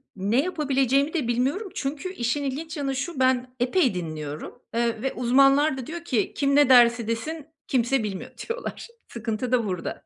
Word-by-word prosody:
Ne 205 Hz, +7 st, +1 dB
yapabileceğimi 280 Hz, -3 st, +1 dB
de 300 Hz, -9 st, -1 dB
bilmiyorum. 270 Hz, -, 0 dB
Çünkü 295 Hz, +7 st, -4 dB
işin 265 Hz, -1 st, -1 dB
ilginç 305 Hz, +4 st, -4 dB
yanı 275 Hz, -2 st, -2 dB
şu, 280 Hz, +2 st, -4 dB
ben 255 Hz, -1 st, +1 dB
epey 250 Hz, -, +2 dB
dinliyorum. 155 Hz, -4 st, -6 dB
Eee, 230 Hz, -1 st, 0 dB
ve 270 Hz, -, -2 dB
uzmanlar 275 Hz, +4 st, +4 dB
da 255 Hz, -, -6 dB
diyor 335 Hz, +1 st, -6 dB
ki, 240 Hz, -11 st, -1 dB
"Kim 280 Hz, 0 st, +1 dB
ne 290 Hz, -2 st, +5 dB
derse 235 Hz, -2 st, +6 dB
desin, 295 Hz, +7 st, -4 dB, 0.2 s
kimse 255 Hz, -1 st, +1 dB
bilmiyor." 195 Hz, -3 st, -5 dB
diyorlar. 465 Hz, +1 st, -5 dB, 0.2 s
Sıkıntı 235 Hz, +1 st, -4 dB
da 245 Hz, -3 st, +2 dB
burada. 180 Hz, -4 st, -4 dB
260 Hz, 165 wpm, -25 LUFS, 235-290 Hz, 0.2 s, derse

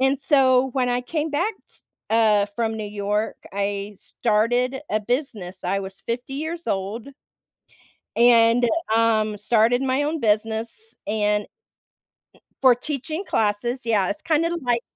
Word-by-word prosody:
And 265 Hz, +1 st, +3 dB
so, 265 Hz, -2 st, +4 dB
when 255 Hz, -2 st, +1 dB
I 245 Hz, 0 st, +1 dB
came 310 Hz, +4 st, -2 dB
back 355 Hz, +10 st, 0 dB
t -, -, -19 dB, 0.3 s
uh, 215 Hz, -3 st, +4 dB
from 225 Hz, -1 st, -1 dB
New 215 Hz, -, -4 dB
York, 210 Hz, +1 st, -2 dB, 0.2 s
I 200 Hz, +1 st, -3 dB
started 245 Hz, +4 st, 0 dB
a 215 Hz, -, +1 dB
business. 210 Hz, -6 st, -4 dB
I 195 Hz, +2 st, 0 dB
was 190 Hz, 0 st, -9 dB
50 245 Hz, +3 st, -4 dB
years 325 Hz, +4 st, -5 dB
old 200 Hz, +6 st, -3 dB, 1.1 s
and, 235 Hz, 0 st, +5 dB, 0.3 s
um, 215 Hz, -2 st, +2 dB
started 230 Hz, +4 st, +2 dB
my 265 Hz, +1 st, +1 dB
own 310 Hz, +2 st, -1 dB
business, 225 Hz, -, -2 dB
and 210 Hz, 0 st, +1 dB
n -, -, -17 dB, 1.1 s
for 260 Hz, -2 st, +7 dB
teaching 305 Hz, +7 st, -5 dB
classes, 230 Hz, -, -1 dB
yeah. 210 Hz, -5 st, +2 dB
It's 305 Hz, -, -4 dB
kinda 330 Hz, +2 st, +1 dB
like 240 Hz, -2 st, 0 dB
235 Hz, 140 wpm, -23 LUFS, 210-265 Hz, 1.1 s, for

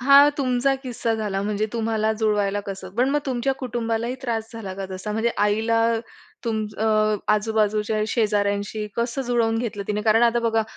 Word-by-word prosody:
हा 280 Hz, +3 st, +8 dB
तुमचा 260 Hz, 0 st, +2 dB
किस्सा 235 Hz, -3 st, -2 dB
झाला 210 Hz, -3 st, -2 dB
म्हणजे 210 Hz, +1 st, -1 dB
तुम्हाला 220 Hz, -1 st, 0 dB
जुळवायला 210 Hz, -2 st, +1 dB
कसं. 190 Hz, -1 st, -6 dB
पण 250 Hz, +4 st, +2 dB
मग 295 Hz, -, +2 dB
तुमच्या 260 Hz, 0 st, 0 dB
कुटुंबालाही 235 Hz, -1 st, -2 dB
त्रास 225 Hz, -3 st, -2 dB
झाला 200 Hz, -5 st, -6 dB
का 195 Hz, 0 st, -5 dB
तसा? 190 Hz, +3 st, -4 dB
म्हणजे 225 Hz, +2 st, +1 dB
आईला 220 Hz, +2 st, +2 dB
अ, 225 Hz, -, 0 dB, 0.5 s
तुम 220 Hz, -2 st, -1 dB
अ, 220 Hz, -, 0 dB, 0.5 s
आजूबाजूच्या 215 Hz, 0 st, +1 dB
शेजाऱ्यांशी 205 Hz, -1 st, 0 dB
कसं 235 Hz, +3 st, -1 dB
जुळवून 235 Hz, -2 st, +1 dB
घेतलं 225 Hz, -4 st, -3 dB
तिने? 210 Hz, 0 st, -1 dB
कारण 225 Hz, +2 st, +4 dB
आता 235 Hz, 0 st, +4 dB
बघा 225 Hz, 0 st, +2 dB
220 Hz, 165 wpm, -23 LUFS, 210-235 Hz, 0.5 s, हा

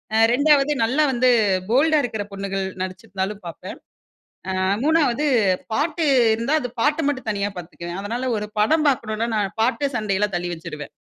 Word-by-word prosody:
அ -, -, +4 dB, 0.2 s
2வது 290 Hz, +1 st, +4 dB
நல்லா 260 Hz, +7 st, +2 dB
வந்து 255 Hz, 0 st, +2 dB, 0.4 s
போல்டா 305 Hz, +6 st, +4 dB
இருக்கற 220 Hz, -4 st, -3 dB
பொண்ணுகள் 195 Hz, -1 st, -3 dB, 0.2 s
நடிச்சிருந்தாலும் 190 Hz, +1 st, -4 dB
பாப்பேன். 180 Hz, +3 st, -8 dB, 0.8 s
அ -, -, +1 dB, 0.2 s
3வது 300 Hz, -3 st, +2 dB, 0.5 s
பாட்டு 310 Hz, +4 st, 0 dB, 0.3 s
இருந்தா, 235 Hz, +7 st, 0 dB
அது 245 Hz, -, -4 dB
பாட்டு 300 Hz, +3 st, +1 dB
மட்டும் 260 Hz, -5 st, -3 dB
தனியா 205 Hz, -1 st, -1 dB
பாத்துக்குவேன். 175 Hz, +1 st, -7 dB
அதனால 240 Hz, +5 st, -3 dB
ஒரு 210 Hz, 0 st, -5 dB
படம் 310 Hz, +9 st, +3 dB
பாக்கணுன்னா 230 Hz, -4 st, -1 dB
நான் 205 Hz, -2 st, -1 dB
பாட்டு, 260 Hz, +5 st, +1 dB
சண்டையெல்லாம் 210 Hz, -2 st, -1 dB
தள்ளி 175 Hz, 0 st, -3 dB
வச்சுருவேன். 155 Hz, -3 st, -8 dB
225 Hz, 145 wpm, -22 LUFS, 195-285 Hz, 0.8 s, அ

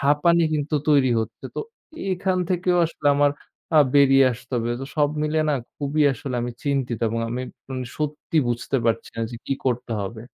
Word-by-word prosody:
হাঁপানি 150 Hz, +4 st, +3 dB
কিন্তু 150 Hz, +1 st, -1 dB
তৈরি 140 Hz, -4 st, +5 dB
হচ্ছে। 110 Hz, -, -7 dB
তো -, -, -2 dB, 0.5 s
এখান 185 Hz, 0 st, 0 dB
থেকেও 180 Hz, 0 st, +2 dB
আসলে 150 Hz, -2 st, -6 dB
আমার 145 Hz, 0 st, +4 dB, 0.5 s
আ -, -, +8 dB, 0.2 s
বেরিয়ে 135 Hz, -1 st, +6 dB
আসতে 120 Hz, +3 st, -12 dB
হবে। 120 Hz, 0 st, -1 dB
তো -, -, -4 dB
সব 145 Hz, -1 st, +4 dB
মিলে 155 Hz, +1 st, 0 dB
না 150 Hz, -, +3 dB, 0.2 s
খুবই 145 Hz, +1 st, 0 dB
আসলে 130 Hz, +1 st, -5 dB
আমি 120 Hz, -, -2 dB
চিন্তিত 135 Hz, -5 st, -1 dB
এবং 115 Hz, +1 st, -2 dB
আমি 120 Hz, +2 st, -3 dB
একদম 130 Hz, -1 st, -9 dB, 0.2 s
সত্যি 150 Hz, +1 st, -3 dB
বুঝতে 120 Hz, +3 st, -1 dB
পারছি 115 Hz, 0 st, 0 dB
না 115 Hz, -, -1 dB
যে 120 Hz, -, -6 dB
কি 135 Hz, -, 0 dB
করতে 125 Hz, -2 st, -1 dB
হবে। 105 Hz, +3 st, -5 dB
140 Hz, 185 wpm, -23 LUFS, 120-150 Hz, 0.5 s, আ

